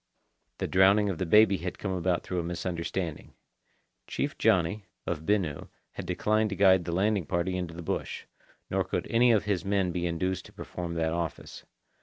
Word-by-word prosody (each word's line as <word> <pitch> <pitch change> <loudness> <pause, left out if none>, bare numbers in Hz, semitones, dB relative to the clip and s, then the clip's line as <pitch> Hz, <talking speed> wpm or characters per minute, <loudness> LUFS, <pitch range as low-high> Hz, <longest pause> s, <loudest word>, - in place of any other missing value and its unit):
The - - -2
drowning 100 +2 +4
of 85 - -6
the 95 - -1
baby 105 +2 +6
had 90 0 -5
come 95 - -3
about 90 -1 0
through 90 - -3
a - - -1
misunderstanding. 85 -1 -4 0.7
Chief - - -2
Johnny, 100 -1 +2 0.2
of 80 -1 -4
Binu, 95 -8 0 0.2
had - - -7
declined 110 0 +1
to 100 - -3
guide 95 -3 +5
the 85 - -3
landing 95 -1 +1
party 85 +3 -1
into 90 -2 -4
the 85 - -7
bush, - - -3 0.5
nor - - +2
could - - -3
any 120 +1 +5
of 110 -3 +3
his 100 -4 -1
men 95 -2 +1
be 90 0 -1
induced 90 +2 -2
to - - -14
perform 85 -1 -6
that 80 -1 0
office. 85 -2 -5
90 Hz, 185 wpm, -28 LUFS, 85-100 Hz, 0.7 s, baby